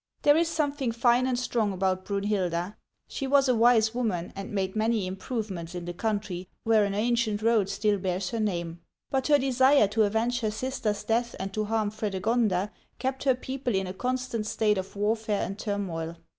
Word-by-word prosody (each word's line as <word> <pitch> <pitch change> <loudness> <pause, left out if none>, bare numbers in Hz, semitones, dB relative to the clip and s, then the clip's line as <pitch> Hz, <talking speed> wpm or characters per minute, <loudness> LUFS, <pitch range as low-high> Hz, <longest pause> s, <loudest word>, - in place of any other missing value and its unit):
There 290 - +6
is 335 +1 +3
something 290 -6 -1
fine 240 +2 +3
and 255 -1 0
strong 235 -4 0
about 185 0 -1
Brunhilda. 200 -2 -1 0.3
She 270 - -4
was 275 0 +4
a 255 - +4
wise 225 -1 +4
woman, 215 -9 -2
and 195 0 -6
made 190 -1 -2
many 220 -2 +1
improvements 190 -3 -4
in 175 -1 -5
the 175 - -4
country, 200 -3 -3 0.2
where 220 -2 +4
an 200 0 -2
ancient 220 -1 0
road 220 -4 +3
still 205 0 +1
bears 185 0 -2
her 230 - -2
name; 175 -5 -2 0.3
but 265 -1 0
her 295 -1 +6
desire 265 -2 +4
to 220 +2 +1
avenge 225 +4 0
her 220 -3 0
sister^s 215 -2 -2
death 235 +1 0
and 195 +1 -4
to 215 +1 -1
harm 215 -1 0
Frede 210 -3 -3
gonda 210 -4 +1 0.3
kept 265 +1 -3
her 260 -2 +4
people 255 -2 -3
in 190 0 0
a 185 - -5
constant 250 -1 -2
state 210 -2 +1
of 190 +2 -7
warfare 210 0 0
and 195 +2 -6
turmoil. 170 -6 -3
215 Hz, 190 wpm, -27 LUFS, 195-245 Hz, 0.3 s, There